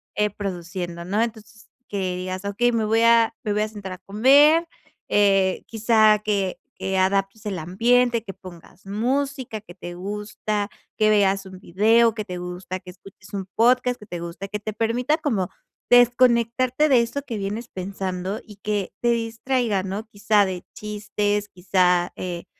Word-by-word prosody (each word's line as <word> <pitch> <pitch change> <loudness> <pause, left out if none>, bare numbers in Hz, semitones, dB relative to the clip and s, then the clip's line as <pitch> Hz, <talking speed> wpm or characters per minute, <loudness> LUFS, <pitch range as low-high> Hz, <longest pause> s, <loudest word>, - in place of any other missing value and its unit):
eh, 210 0 +2
produciendo, 175 -3 -5
¿no? 205 +5 0
Entonces, 220 -1 -6 0.2
que 190 -3 -2
digas 185 +1 -5
okey, 240 +5 +1
me 225 - +1
voy 225 +1 +2
a 230 0 +5
me 210 - 0
voy 210 - +1
a 215 - +1
sentar 205 -3 -8
a 185 - -8
comer, 285 +10 +5 0.4
eh 195 -2 +3
quizá 220 -1 +4
que 200 -3 0 0.2
que 190 0 -2
adaptes 195 +3 0
el 195 -4 -3
ambiente, 235 +7 +2
que 195 - -8
pongas 185 +1 -14
música, 255 +1 -2
que 175 -5 -14
te 175 -2 -8
gusta, 205 +2 -3 0.3
que 215 0 +4
veas 195 -1 +2
un 185 -1 -11
video 225 +5 +3
que 215 -2 -4
te 180 -1 -6
gusta, 180 +1 -6
que 180 0 -13
escuches 190 +2 -15
un 195 -1 -3
podcast 250 +1 +3
que 210 - -13
te 175 -4 -5
gusta, 170 +3 -6
que 210 +1 -4
te 215 0 -5
permita 240 +7 0
como 220 - -1 0.4
desconectarte 245 +3 +4
de 255 -4 +6
eso 235 +5 -3
que 235 -6 -6
vienes 210 +4 -4
pensando 190 +1 -4
y 210 - -13
que 205 -2 -2
te 240 - +1
distraiga, 230 -2 0
¿no? 200 +4 -5
Quizá 210 -1 +2
de 180 -1 -5
chistes, 210 -1 -2
quizá, 180 -1 +1
eh, 175 -2 -5
210 Hz, 165 wpm, -23 LUFS, 190-230 Hz, 0.4 s, de